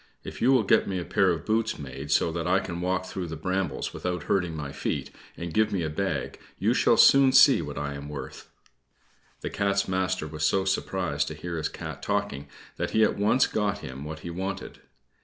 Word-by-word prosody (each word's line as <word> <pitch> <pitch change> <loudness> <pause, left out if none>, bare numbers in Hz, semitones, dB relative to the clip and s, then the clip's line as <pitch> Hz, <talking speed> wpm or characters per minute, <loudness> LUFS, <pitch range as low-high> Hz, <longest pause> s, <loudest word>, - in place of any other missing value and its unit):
If - - -8
you 125 - +5
will 130 -4 +4
get - - +3
me 95 - -2
a 85 - -5
pair 95 - +2
of 85 -2 -1
boots 110 +1 0
made 70 0 -7
so 80 +2 +3
that 85 +1 -3
I 95 +2 +4
can 90 -3 -5
walk 95 +1 0
through 90 -1 -5
the 80 - -5
brambles 90 -2 -2
without 90 -1 -3
hurting 90 -4 0
my 75 -3 -5
feet, - - -3 0.3
and 85 -1 -5
give 110 0 +2
me 95 -4 -1
a 80 - -2
bag, 95 +5 -2 0.2
you - - +2
shall - - +3
soon 135 -1 +7
see 135 - +7
what 75 -2 -6
I 75 -1 -3
am 70 +1 -7
worth." 70 -3 -8 0.9
The - - -4
Cat's 100 0 0
master 95 -2 -1
was 75 0 -5
so 95 +5 +2
surprised 90 -6 -1
to 80 - -5
hear 85 +3 -5
his 80 - -2
Cat - - -7
talking, 70 +1 -2 0.3
that - - -2
he 110 - +6
at - - +2
once 105 +6 +3
got 100 -1 -1
him 65 +2 -7
what 80 +1 -7
he 85 - -6
wanted. 95 +3 -5
90 Hz, 215 wpm, -27 LUFS, 75-95 Hz, 0.9 s, soon